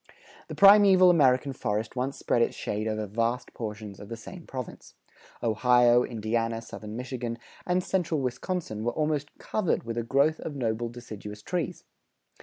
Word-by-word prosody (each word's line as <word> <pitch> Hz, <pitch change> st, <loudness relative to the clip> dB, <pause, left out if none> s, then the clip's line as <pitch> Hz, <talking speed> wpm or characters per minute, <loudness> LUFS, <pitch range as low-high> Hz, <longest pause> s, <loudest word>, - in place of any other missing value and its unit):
The -, -, -7 dB
primeval 195 Hz, -2 st, +8 dB
American 135 Hz, -4 st, +3 dB
forest 110 Hz, -2 st, -3 dB
once 130 Hz, +2 st, -2 dB
spread 120 Hz, -, +1 dB
its -, -, +1 dB
shade 105 Hz, +1 st, -3 dB
over 110 Hz, -1 st, -2 dB
vast 115 Hz, +4 st, -2 dB
portions 105 Hz, -3 st, -6 dB
of 100 Hz, -, -10 dB
the 115 Hz, -, -5 dB
same 170 Hz, +9 st, -11 dB
province. 130 Hz, -3 st, -8 dB, 0.5 s
Ohio, 120 Hz, +1 st, +4 dB
Indiana, 115 Hz, 0 st, -1 dB
southern 110 Hz, -1 st, -8 dB
Michigan, 125 Hz, -1 st, -4 dB, 0.3 s
and 180 Hz, 0 st, +1 dB
central 170 Hz, -5 st, 0 dB
Wisconsin 130 Hz, -, -3 dB
were 120 Hz, +1 st, -1 dB
almost 150 Hz, -2 st, -1 dB
covered 210 Hz, -6 st, -1 dB
with 115 Hz, 0 st, -3 dB
a -, -, -2 dB
growth 140 Hz, +6 st, +2 dB
of 150 Hz, -, -6 dB
noble 120 Hz, -2 st, -1 dB
deciduous 105 Hz, -3 st, -9 dB
trees. 175 Hz, -5 st, -3 dB
120 Hz, 155 wpm, -27 LUFS, 110-150 Hz, 0.5 s, primeval